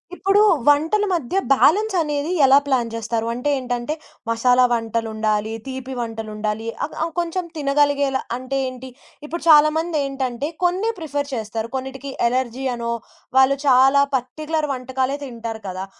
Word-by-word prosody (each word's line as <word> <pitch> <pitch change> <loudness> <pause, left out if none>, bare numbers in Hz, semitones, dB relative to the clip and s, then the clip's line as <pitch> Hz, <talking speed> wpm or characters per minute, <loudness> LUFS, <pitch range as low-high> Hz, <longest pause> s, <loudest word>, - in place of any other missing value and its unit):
ఇప్పుడు 390 +2 +2 0.3
వంటల 320 +9 +4
మధ్య 335 -1 -2 0.2
బ్యాలెన్స్ 400 +10 +4
అనేది 295 +1 -1
ఎలా 270 +1 +7
ప్లాన్ 250 -4 +1
జేస్తారు? 230 0 -2
అంటే 250 +5 -2
ఏంటంటే, 245 +3 -3 0.4
మసాలా 245 +2 +3
వంటలుండాలి, 220 -2 -1
తీపి 260 0 -6
వంటలుండాలి. 220 -1 -4 0.2
ఆహ్, 295 - -10
ఆ - - +1
కొంచెం 345 +1 -2
తినగలిగేలా 285 -2 +1 0.2
అంటే 260 +2 -4
ఏంటి? 255 0 -9 0.4
ఇప్పుడు 335 +3 -5
చాలా 305 0 +8
మంది 325 -1 -1
ఏంటంటే 270 -1 -3 0.2
కొన్నే 370 +6 +1
ప్రిఫర్ 290 -4 -3
చేస్తారు. 220 0 -4
కొన్నిటికి 265 +1 -5 0.2
అలెర్జీ 255 +1 -2
అనో, 235 -1 -3 0.5
వాళ్ళు 265 +1 +5
చాలా 270 +2 +6
పర్టిక్యులర్ 305 +5 -2
వంటకాలే 260 +1 -2
తింటారు 230 -4 -6
కదా! 185 +1 -5
265 Hz, 135 wpm, -21 LUFS, 235-295 Hz, 0.5 s, చాలా